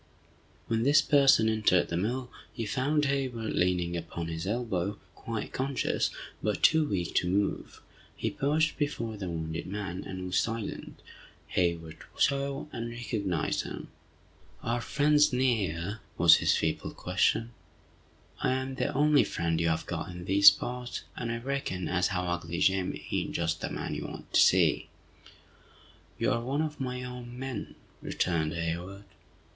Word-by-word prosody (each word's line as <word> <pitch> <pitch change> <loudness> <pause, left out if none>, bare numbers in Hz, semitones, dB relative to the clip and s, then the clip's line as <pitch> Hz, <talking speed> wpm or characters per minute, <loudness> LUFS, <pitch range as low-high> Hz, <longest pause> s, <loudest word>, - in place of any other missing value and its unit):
When 115 -1 0
this 145 +4 +5
person 140 -6 +5
entered 110 -5 +3
the 85 - -2
mill, 125 +8 -2 0.2
he 115 -3 -4
found 145 +6 +1
Hayward 130 -5 -1
leaning 90 -1 +1
upon 85 0 -4
his 80 +2 -4
elbow, 105 -3 -1 0.2
quite 115 -2 -5
conscious, 135 +1 0 0.3
but 105 -1 -1
too 160 -1 +5
weak 90 -4 -2
to 90 - +2
move. 100 +2 -1 0.3
He - - -2
paused 155 +3 +1
before 115 -7 -2
the 95 -3 -5
wounded 80 0 -4
man, 95 -1 -4
and 95 -1 -6
was 90 0 +1
silent, 115 -2 -4 0.5
Hayward 85 -3 -1 0.2
saw, 140 0 +1
and 115 0 -4
recognized 110 -7 -1
him. - - -7 0.7
"Are 120 +1 0
friends 150 +3 +3
near?" 110 -7 0 0.2
was - - +8
his - - +2
feeble - - -2
question. 115 +1 +1 0.9
"I 130 - +1
am 130 +1 -2
the - - -1
only 150 0 +5
friend 85 -1 -1
you 85 - +2
have 80 - -1
got - - -4
in 90 -1 -8
these 100 +1 +9
parts, 125 +5 -4
and 115 -1 -3
I 115 - -2
reckon 120 -7 -3
as 90 -1 +2
how 90 -3 -1
'ugly 85 -1 -3
Jim' 95 0 +1
ain't - - -1
just 85 -1 -1
the - - -2
man - - -4
you - - -4
want - - -10
to - - +5
see!" - - +4 1.3
"You - - +1
are 115 - +1
one 135 +6 -1
of 155 -1 -4
my 125 -1 -3
own 125 -1 -8
men!" 130 -5 -5 0.3
returned 80 -4 0
Hayward. 85 +4 -4
110 Hz, 155 wpm, -29 LUFS, 90-130 Hz, 1.3 s, these